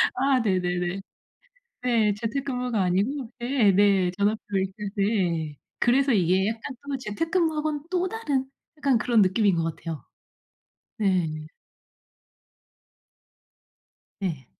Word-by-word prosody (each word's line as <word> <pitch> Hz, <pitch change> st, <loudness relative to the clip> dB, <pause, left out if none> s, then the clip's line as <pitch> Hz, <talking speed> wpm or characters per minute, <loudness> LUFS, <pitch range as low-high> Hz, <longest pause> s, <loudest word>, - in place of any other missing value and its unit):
아 265 Hz, 0 st, +3 dB
네네네. 180 Hz, -2 st, 0 dB, 0.8 s
네. 225 Hz, -4 st, +2 dB
재택 230 Hz, +6 st, -3 dB
근무가 250 Hz, -6 st, -1 dB
아니고 225 Hz, +8 st, 0 dB
예 240 Hz, -5 st, +3 dB
네. 195 Hz, -2 st, +4 dB
전업 205 Hz, +2 st, +1 dB
그러니까 195 Hz, -1 st, -1 dB, 0.2 s
네. 175 Hz, -8 st, 0 dB, 0.2 s
그래서 265 Hz, +2 st, +3 dB
이게 190 Hz, 0 st, +3 dB
약간 230 Hz, +4 st, -5 dB
또 275 Hz, -, -1 dB
재택 255 Hz, +8 st, -3 dB
근무하고는 310 Hz, -4 st, 0 dB
또 370 Hz, 0 st, +1 dB
다른 285 Hz, -12 st, -2 dB, 0.3 s
약간 275 Hz, -5 st, +2 dB
그런 235 Hz, -1 st, +3 dB
느낌인 195 Hz, -1 st, +3 dB
것 165 Hz, -1 st, -1 dB
같아요. 160 Hz, -5 st, -6 dB, 0.9 s
네. 170 Hz, -7 st, 0 dB, 2.8 s
예. 155 Hz, -10 st, -3 dB
210 Hz, 220 characters per minute, -26 LUFS, 185-265 Hz, 2.8 s, 네